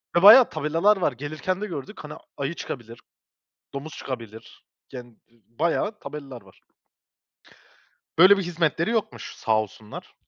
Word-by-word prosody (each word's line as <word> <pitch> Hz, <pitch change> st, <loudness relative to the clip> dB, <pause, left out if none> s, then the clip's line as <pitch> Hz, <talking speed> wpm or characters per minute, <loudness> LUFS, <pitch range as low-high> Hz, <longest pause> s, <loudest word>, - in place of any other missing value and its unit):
Ya, 175 Hz, -, +3 dB
bayağı 230 Hz, +5 st, +10 dB
tabelalar 165 Hz, +7 st, +1 dB
var. 175 Hz, -6 st, +1 dB
Gelirken 155 Hz, -, -4 dB
de 210 Hz, -, -3 dB
gördük. 170 Hz, +3 st, -8 dB
Hani, 150 Hz, -, -8 dB, 0.2 s
ayı 140 Hz, +4 st, -3 dB
çıkabilir, 120 Hz, -7 st, -8 dB, 0.7 s
domuz 140 Hz, +3 st, -7 dB
çıkabilir; 115 Hz, -4 st, -9 dB, 0.3 s
yani 125 Hz, -2 st, -9 dB, 0.2 s
ı -, -, -29 dB
ı 115 Hz, -, -31 dB, 0.2 s
bayağı 205 Hz, +6 st, 0 dB
tabelalar 135 Hz, -5 st, -9 dB
var. 95 Hz, -1 st, -21 dB, 1.6 s
Böyle 195 Hz, +3 st, +8 dB
bir -, -, -1 dB
hizmetleri 170 Hz, +2 st, -1 dB
yokmuş 200 Hz, -, -3 dB
sağ 110 Hz, -1 st, +1 dB
olsunlar. 110 Hz, 0 st, -10 dB
150 Hz, 140 wpm, -24 LUFS, 120-185 Hz, 1.6 s, bayağı